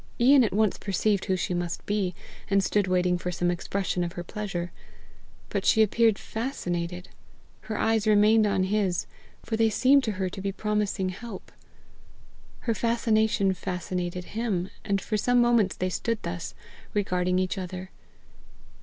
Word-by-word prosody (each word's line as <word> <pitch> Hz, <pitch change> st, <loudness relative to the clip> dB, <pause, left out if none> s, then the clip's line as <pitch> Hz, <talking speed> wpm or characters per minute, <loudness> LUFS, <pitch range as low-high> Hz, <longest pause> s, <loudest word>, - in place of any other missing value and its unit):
Ian 260 Hz, +2 st, +7 dB
at 220 Hz, -, +1 dB
once 215 Hz, 0 st, +1 dB
perceived 200 Hz, 0 st, 0 dB
who 190 Hz, -, +1 dB
she 180 Hz, 0 st, -2 dB
must 175 Hz, -1 st, -3 dB
be, 200 Hz, -4 st, -1 dB, 0.3 s
and 195 Hz, -1 st, +3 dB
stood 205 Hz, 0 st, +1 dB
waiting 180 Hz, -1 st, +2 dB
for 180 Hz, -, -3 dB
some 175 Hz, 0 st, 0 dB
expression 180 Hz, +1 st, -2 dB
of 170 Hz, 0 st, -4 dB
her 175 Hz, -, -5 dB
pleasure. 175 Hz, -3 st, -4 dB, 0.8 s
But -, -, -2 dB
she 220 Hz, -, +5 dB
appeared 220 Hz, 0 st, +3 dB
fascinated; 180 Hz, -7 st, -4 dB, 0.6 s
her 215 Hz, -, -2 dB
eyes 225 Hz, -1 st, +1 dB
remained 215 Hz, +1 st, +5 dB
on 195 Hz, -2 st, +1 dB
his, 190 Hz, -2 st, 0 dB, 0.4 s
for 225 Hz, -, -2 dB
they 225 Hz, 0 st, +4 dB
seemed 260 Hz, +5 st, +4 dB
to 215 Hz, -, -1 dB
her 190 Hz, -1 st, -2 dB
to 190 Hz, +1 st, -6 dB
be 195 Hz, 0 st, -1 dB
promising 210 Hz, -2 st, -1 dB
help. 200 Hz, +2 st, -8 dB, 1.1 s
Her 230 Hz, -, 0 dB
fascination 220 Hz, -3 st, +2 dB
fascinated 180 Hz, 0 st, -4 dB
him, 210 Hz, -5 st, -1 dB
and 200 Hz, -2 st, 0 dB
for 215 Hz, +2 st, -2 dB
some 245 Hz, +4 st, +3 dB
moments 235 Hz, -5 st, +3 dB
they 185 Hz, -, -1 dB
stood 230 Hz, +5 st, -1 dB
thus, 170 Hz, 0 st, -5 dB, 0.4 s
regarding 180 Hz, -3 st, +1 dB
each 185 Hz, +1 st, 0 dB
other. 185 Hz, 0 st, -6 dB
195 Hz, 155 wpm, -27 LUFS, 180-220 Hz, 1.1 s, Ian